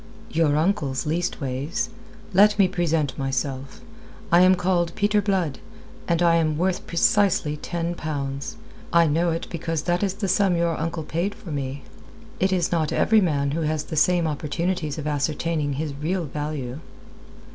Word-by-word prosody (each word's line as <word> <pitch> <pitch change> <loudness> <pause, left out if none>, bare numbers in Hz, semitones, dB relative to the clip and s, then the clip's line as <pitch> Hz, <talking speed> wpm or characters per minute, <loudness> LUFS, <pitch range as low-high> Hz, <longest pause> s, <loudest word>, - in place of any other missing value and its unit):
"Your 155 -2 +2
uncle's, 150 -6 0
leastways. 150 -3 -2 0.4
Let 205 +3 +6
me 195 -2 +5
present 165 -7 0
myself. 135 - -3 0.5
I 170 +1 +7
am 185 +1 +6
called 175 -2 0
Peter 210 0 +2
Blood, 185 -8 0 0.5
and 170 0 +2
I 170 -1 +5
am 155 -2 +1
worth 180 +2 -1
precisely 170 -3 +2
ten 170 +2 -3
pounds. 140 -4 -4 0.3
I 170 -1 +5
know 165 +3 +2
it 165 0 -2
because 165 -2 -2
that 175 +1 0
is 195 -2 0
the 200 -1 -2
sum 190 -1 +3
your 170 -1 +1
uncle 165 +1 -3
paid 170 +6 -2
for 170 - -10
me. 140 -1 -4 0.6
It 190 +1 +2
is 180 -3 +1
not 160 -3 +1
every 220 -1 +4
man 140 -6 +1
has 155 0 -1
the - - -6
same 170 +3 +3
opportunities 155 +1 -2
of 150 - -5
ascertaining 150 0 -1
his 150 +1 -3
real 165 +5 -2
value." 145 -3 -4
165 Hz, 155 wpm, -24 LUFS, 150-175 Hz, 0.6 s, I